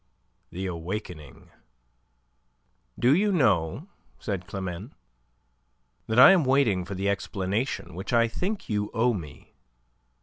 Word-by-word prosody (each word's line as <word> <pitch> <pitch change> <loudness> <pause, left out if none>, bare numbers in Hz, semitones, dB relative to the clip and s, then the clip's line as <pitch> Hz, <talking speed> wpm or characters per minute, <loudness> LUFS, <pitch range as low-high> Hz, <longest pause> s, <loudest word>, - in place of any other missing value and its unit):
THE 95 +2 -5
AWAKENING 85 - -7 1.5
"Do 125 +3 +4
you 205 +4 +2
know," 115 - +1 0.3
said 95 -6 -5
Climene, 95 +3 -6 1.1
"that 110 - -1
I 130 - +10
am 185 -4 +4
waiting 130 -9 +2
for 100 - -6
the 95 +2 -2
explanation 100 - -2
which 95 +3 -6
I 115 -1 +4
think 190 - -4
you 105 -1 -1
owe 120 +2 +2
me?" 80 - -9
100 Hz, 115 wpm, -26 LUFS, 90-125 Hz, 1.5 s, I